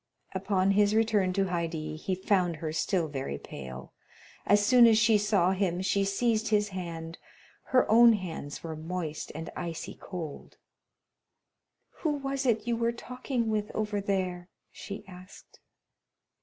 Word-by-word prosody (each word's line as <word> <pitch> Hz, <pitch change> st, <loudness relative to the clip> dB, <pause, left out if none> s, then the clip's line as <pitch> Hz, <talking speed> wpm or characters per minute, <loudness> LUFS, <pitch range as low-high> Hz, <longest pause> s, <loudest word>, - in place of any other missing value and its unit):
Upon 190 Hz, 0 st, +1 dB
his 205 Hz, +1 st, +3 dB
return 215 Hz, -4 st, +2 dB
to 195 Hz, +1 st, +1 dB
Haydée 165 Hz, -4 st, -3 dB
he 185 Hz, +4 st, -2 dB
found 180 Hz, -2 st, +1 dB
her 155 Hz, 0 st, -4 dB
still 170 Hz, +1 st, 0 dB
very 135 Hz, -, -4 dB
pale. 65 Hz, -2 st, -9 dB, 0.5 s
As 205 Hz, 0 st, +4 dB
soon 245 Hz, +1 st, +7 dB
as 225 Hz, -1 st, +5 dB
she 220 Hz, 0 st, +5 dB
saw 200 Hz, -3 st, +2 dB
him 185 Hz, -2 st, 0 dB
she 200 Hz, +1 st, +2 dB
seized 220 Hz, +3 st, +1 dB
his 210 Hz, -1 st, +2 dB
hand; 165 Hz, -3 st, -6 dB, 0.5 s
her 255 Hz, -1 st, +3 dB
own 235 Hz, +1 st, +7 dB
hands 170 Hz, -8 st, -5 dB
were 160 Hz, -1 st, -5 dB
moist 160 Hz, -1 st, -5 dB
and 160 Hz, +1 st, -6 dB
icy 170 Hz, -2 st, -5 dB
cold. 165 Hz, -6 st, -7 dB, 1.4 s
"Who 310 Hz, -3 st, 0 dB
was 275 Hz, -1 st, -2 dB
it 220 Hz, -2 st, +2 dB
you 240 Hz, -1 st, 0 dB
were 230 Hz, 0 st, +1 dB
talking 245 Hz, 0 st, -3 dB
with 210 Hz, -1 st, -1 dB
over 210 Hz, -1 st, -1 dB
there?" 185 Hz, -2 st, -2 dB, 0.2 s
she 200 Hz, 0 st, -8 dB
asked. 185 Hz, 0 st, -14 dB
195 Hz, 145 wpm, -29 LUFS, 170-220 Hz, 1.4 s, soon